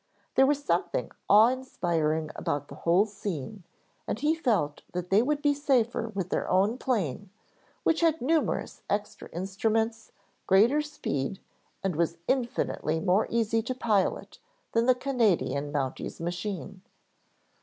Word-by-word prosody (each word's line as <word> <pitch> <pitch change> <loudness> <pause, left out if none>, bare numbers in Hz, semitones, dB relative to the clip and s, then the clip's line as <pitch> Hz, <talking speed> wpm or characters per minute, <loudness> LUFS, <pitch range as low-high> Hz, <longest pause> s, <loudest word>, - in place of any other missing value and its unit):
There 265 0 +5
was 290 0 +1
something - - 0 0.2
awe 215 +3 +8
inspiring 165 -11 -1
about 145 0 -3
the - - -9
whole 175 +5 +3
scene 200 -3 -5 0.5
and - - -2
he 300 +4 +2
felt 220 - 0
that 180 0 -4
they 200 +3 +6
would 290 +3 -1
be 290 -1 +4
safer 245 -5 +1
with 190 -2 -3
their - - -1
own 200 +7 +2
plane, 205 - -1 0.5
which 325 - +2
had 325 -1 +3
numerous 315 +5 0
extra 205 0 -3
instruments, 220 +5 -1 0.4
greater 230 +10 +5
speed, 190 - -3 0.4
and 190 -4 0
was 170 +1 0
infinitely 235 - 0
more 185 +5 +2
easy 225 -1 +1
to 255 +3 -4
pilot 215 -6 0 0.3
than 230 +1 +2
the 255 - +6
Canadian 220 - +1
Mounty's 135 -3 -3
machine. 185 +2 -4
210 Hz, 135 wpm, -28 LUFS, 175-255 Hz, 0.5 s, awe